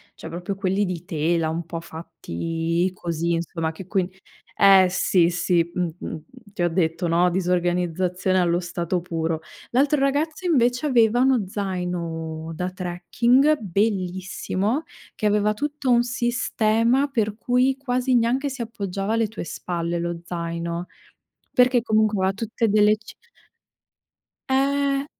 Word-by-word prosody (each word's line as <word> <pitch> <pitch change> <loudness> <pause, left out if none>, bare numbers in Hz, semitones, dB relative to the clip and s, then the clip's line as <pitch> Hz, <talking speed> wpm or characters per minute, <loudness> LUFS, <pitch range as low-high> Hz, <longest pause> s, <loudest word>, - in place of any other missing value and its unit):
cioè 165 - -9
proprio 175 +4 -4
quelli 195 +1 0
di 180 -2 -5
tela, 160 0 0
un 165 +1 -3
po' 165 0 -5
fatti 165 - -3
così 170 -1 -2
insomma, 165 -1 -2
che 180 +3 -10
quin 185 -3 0 0.5
eh 195 -1 +7
sì, 180 -1 +2
sì, 175 -1 +1
mh-mh, 175 -2 -3 0.4
ti 190 - -4
ho 175 - +3
detto, 170 0 0
no, 175 +2 +3
disorganizzazione 180 +1 0
allo 175 -1 +2
stato 175 0 -2
puro. 165 -2 -2 0.3
L'altro 275 +3 +3
ragazzo 300 +5 0
invece 250 -4 +2
aveva 240 -3 +4
uno 260 -5 +3
zaino 170 -5 -4
da 180 +3 -2
trekking 220 - +2
bellissimo, 195 - -1 0.3
che - - -3
aveva 210 0 +3
tutto 290 +2 -3
un 240 -1 +5
sistema 240 +1 +1
per 215 -6 -1
cui 250 +3 +2
quasi 255 -1 0
neanche 250 +5 +2
si 270 -1 -6
appoggiava 200 -2 -3
alle 225 -1 +2
tue 215 - -7
spalle 170 +1 -3
lo 170 0 -3
zaino, 170 0 -4 0.7
perché 250 -1 +4
comunque 215 -2 +2
aveva 190 +1 +1
tutte 225 +2 -1
delle 210 +1 +5
ci 220 - -14 1.3
Eh. 275 +1 +1
190 Hz, 135 wpm, -23 LUFS, 170-235 Hz, 1.3 s, eh